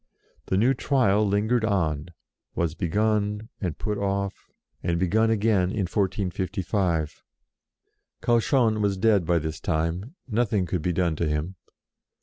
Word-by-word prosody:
The 95 - +1
new 120 +7 +4
Trial 110 -8 +2
lingered 110 +4 +1
on, 80 -8 0 0.5
was 85 -2 0
begun, 105 +5 0
and 90 -6 -3
put 105 -2 -2
off, 100 0 -2 0.3
and 85 0 0
begun 110 +5 +2
again 105 -4 +2
in 100 -1 -1
1455. 95 -3 -1 1.0
Cauchon 115 -2 +3
was 100 -2 +1
dead 100 -4 +3
by 85 - +3
this 80 -1 -3
time; 85 - -2
nothing 110 -5 +1
could 90 0 -2
be 90 - 0
done 85 -2 +1
to 85 - 0
him. 75 +5 -2
100 Hz, 130 wpm, -25 LUFS, 85-110 Hz, 1.0 s, new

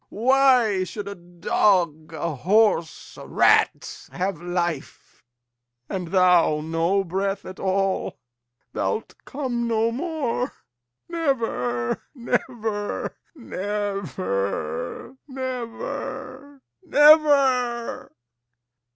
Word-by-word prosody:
Why 245 -4 +3
should 200 +3 -6
a 200 - -4
dog, 175 -2 0
a 160 +1 -3
horse, 185 - +1
a - - -10
rat, 425 -1 +2
have 185 -3 -3
life, 175 -4 -4 0.6
And 185 -3 -4
thou 180 -4 +4
no 165 +5 0
breath 195 +2 -2
at 185 - -9
all? 195 0 0 0.6
Thou'lt 220 - -2
come 250 -4 -2
no 225 0 +1
more, 275 -3 -2 0.5
Never, 225 - -1
never, 230 -4 -2 0.2
never, 185 - -3
never, 260 +1 -6 0.3
never! 275 -6 +4
205 Hz, 80 wpm, -24 LUFS, 175-255 Hz, 0.6 s, thou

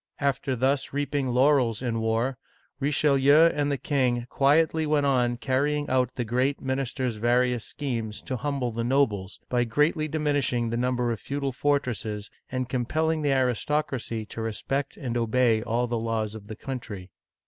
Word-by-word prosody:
After 140 -2 0
thus 135 +3 0
reaping 145 -1 -1
laurels 125 -2 +3
in 115 -2 -1
war, 115 +4 0 0.4
Richelieu 145 +2 +4
and 145 -1 0
the 140 - 0
king 125 -3 0
quietly 155 +3 +3
went 150 -1 +2
on 125 -3 +2
carrying 145 +4 0
out 130 -1 +1
the 125 - -2
great 125 +5 0
minister's 130 -2 -2
vari 125 +3 +2
ous 120 -2 -4
schemes 115 -7 -4
to 130 - -3
humble 135 -2 -2
the 115 +1 -3
nobles, 115 -7 0
by 120 -1 +1
greatly 150 +6 +1
diminishing 145 -6 0
the - - -1
number 125 0 0
of 115 - -3
feudal 140 -1 -3
fortresses, 120 -6 -1 0.2
and 130 -1 -2
compelling 155 +6 0
the 145 -2 +1
aris 130 -4 +1
tocracy 130 -7 -2
to 115 - -6
respect 130 +5 -3
and 120 -5 -3
obey 115 -1 +2
all 120 +2 0
the 120 -1 -2
laws 110 -2 -2
of 105 -2 -10
the 110 - -7
country. 105 -8 -7
130 Hz, 165 wpm, -26 LUFS, 115-140 Hz, 0.4 s, Richelieu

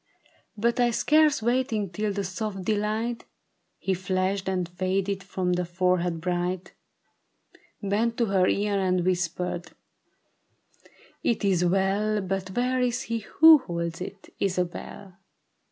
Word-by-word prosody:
" - - -37
But 235 +4 +1
I 240 -1 +4
scarce 300 +1 +3
waiting 235 -5 0
till 210 +3 -1
the 200 0 -2
soft 195 +1 -4
delight 215 +3 -1 0.6
Had 190 -2 +1
flashed 190 +1 -1
and 180 -2 -1
faded 190 +2 -1
from 180 -1 -1
her 180 - 0
forehead 175 -1 0
bright, 180 +1 -2 1.1
Bent 220 +4 0
to 235 - +2
her 190 -3 +2
ear 205 0 +1
and 185 -2 +1
whispered, 180 -1 -2 0.7
' - - -44 0.7
It 230 -3 0
is 185 -3 +2
well, 195 +4 +1
But 190 -1 -3
where 255 +1 +1
is 250 +1 0
he 230 0 -2
who 315 +9 +7
holds 170 -6 -4
it, 190 +1 -8
Isabel 185 0 -3
195 Hz, 135 wpm, -26 LUFS, 180-220 Hz, 1.1 s, who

